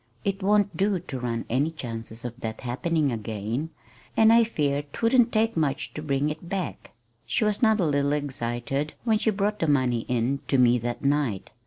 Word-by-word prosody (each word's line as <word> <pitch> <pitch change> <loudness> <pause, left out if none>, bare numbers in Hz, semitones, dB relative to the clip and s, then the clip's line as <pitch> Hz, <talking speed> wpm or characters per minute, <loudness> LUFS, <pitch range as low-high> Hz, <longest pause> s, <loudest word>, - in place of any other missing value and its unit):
It 195 0 -1
won't 205 +1 +2
do 195 0 +1
to 155 -7 -6
run 115 -2 -3
any 135 +6 +1
chances 115 -6 -6
of 120 0 -6
that 110 -2 -5
happening 145 +4 0
again; 110 +5 -3 0.5
and 220 0 +7
I 230 0 +7
fear 145 -10 0
'twouldn't 230 - +2
take 225 +1 +2
much 155 -2 -1
to 150 - -5
bring 145 0 0
it 160 +3 -8
back. 190 -4 -4 0.4
She 120 - +1
was 210 -1 0
not 220 -2 +4
a 180 - +2
little 140 -1 +1
excited 135 0 -2
when 220 -3 +2
she 220 - +2
brought 210 0 0
the 165 - +1
money 130 -5 +2
in 125 +3 0
to 135 - +2
me 125 -1 +5
that 120 +3 -4
night. 140 -9 0
145 Hz, 190 wpm, -26 LUFS, 120-195 Hz, 0.5 s, and